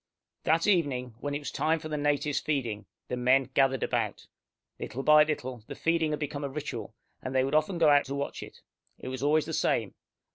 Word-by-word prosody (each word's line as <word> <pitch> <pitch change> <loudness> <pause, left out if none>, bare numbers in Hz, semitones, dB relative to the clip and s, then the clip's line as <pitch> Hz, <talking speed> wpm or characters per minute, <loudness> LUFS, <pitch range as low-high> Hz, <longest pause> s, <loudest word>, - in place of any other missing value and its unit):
That 165 +1 +3
evening, 140 - +1
when 145 +2 -3
it - - +1
was 145 - -6
time 160 +1 +1
for 155 - -7
the 155 - -3
natives' 145 0 0
feeding, 120 -9 -2 0.2
the - - -2
men 130 +2 +2
gathered 135 -1 +3
about. - - -2 0.5
Little 130 +5 -5
by 150 +1 +7
little 130 -6 -4
the - - -7
feeding 165 -1 +1
had 150 - -2
become 145 -1 -4
a 140 - -2
ritual, 135 -6 -6 0.3
and 130 +1 -5
they 130 - +4
would 135 - -2
often 155 +4 +2
go 165 -2 +5
out 145 -1 +5
to 140 0 -4
watch 140 0 -4
it. - - -11 0.4
It - - -7
was 130 0 -5
always 150 +2 +3
the - - -5
same. - - 0
145 Hz, 215 wpm, -29 LUFS, 130-155 Hz, 0.5 s, by